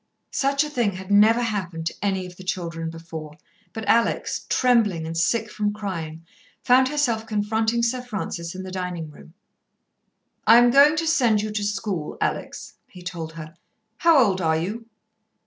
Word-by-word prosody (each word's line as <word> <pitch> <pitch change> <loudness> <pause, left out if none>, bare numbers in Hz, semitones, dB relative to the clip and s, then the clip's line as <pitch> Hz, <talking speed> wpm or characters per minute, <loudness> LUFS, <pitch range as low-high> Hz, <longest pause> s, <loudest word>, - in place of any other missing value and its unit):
Such 275 +1 +1
a 300 - -5
thing 235 -7 0
had 190 +2 -8
never 220 +4 +5
happened 185 -7 -3
to 165 - -1
any 190 -2 -1
of 180 0 -11
the 185 - -12
children 170 -3 -3
before, 160 -2 -9 0.3
but 220 0 -7
Alex, 230 0 +1
trembling 220 -10 +2
and 165 +1 -5
sick 210 +6 0
from 210 -1 -1
crying, 165 -6 -6 0.4
found 255 +1 +5
herself 245 -6 0
confronting 220 +2 0
Sir 250 +2 0
Francis 190 -7 -5
in 185 - -6
the 190 - -8
dining 180 -4 -5
room. 160 +3 -16 1.1
"I 230 - +9
am 240 0 +6
going 285 +4 +6
to 330 +1 -1
send 240 -10 +2
you 215 - -3
to 210 -1 -2
school, 205 -6 -3
Alex," - - -3
he 180 - -13
told 165 -2 -6
her. 155 0 -9 0.4
"How 335 -2 +5
old 200 -8 +3
are 160 -1 +2
you?" 210 +8 -4
205 Hz, 170 wpm, -23 LUFS, 170-235 Hz, 1.1 s, I